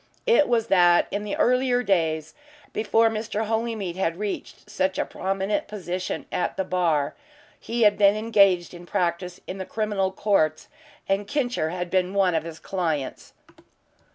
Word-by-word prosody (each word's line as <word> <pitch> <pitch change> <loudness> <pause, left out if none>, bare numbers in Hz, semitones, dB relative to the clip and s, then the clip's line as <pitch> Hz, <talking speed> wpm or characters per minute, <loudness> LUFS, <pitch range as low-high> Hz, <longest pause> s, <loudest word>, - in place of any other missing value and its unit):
It 465 -11 +4
was 235 -2 +2
that 175 -4 +4
in 205 - -2
the 210 - -3
earlier 250 0 +2
days 160 -6 0 0.4
before 225 +1 +3
Mr. 220 0 -3
Holymead 220 -5 -2
had 170 -3 -1
reached 205 0 -5
such 190 -2 -1
a - - 0
prominent 195 +2 -2
position 185 -3 -4
at 180 - -2
the 190 - +1
bar, 170 -6 0 0.5
he 235 0 -1
had 205 -1 +4
been 200 0 +6
engaged 200 -6 +3
in 175 0 -11
practice 175 +1 -2
in 190 - -6
the - - -2
criminal 205 -3 -1
courts, 190 -6 +1 0.4
and 195 +1 0
"Kincher" 245 - -1
had 180 0 -4
been 185 +1 +1
one 190 -3 +3
of 160 - +1
his 165 -1 -7
clients. 160 -9 -3
195 Hz, 155 wpm, -25 LUFS, 175-215 Hz, 0.5 s, been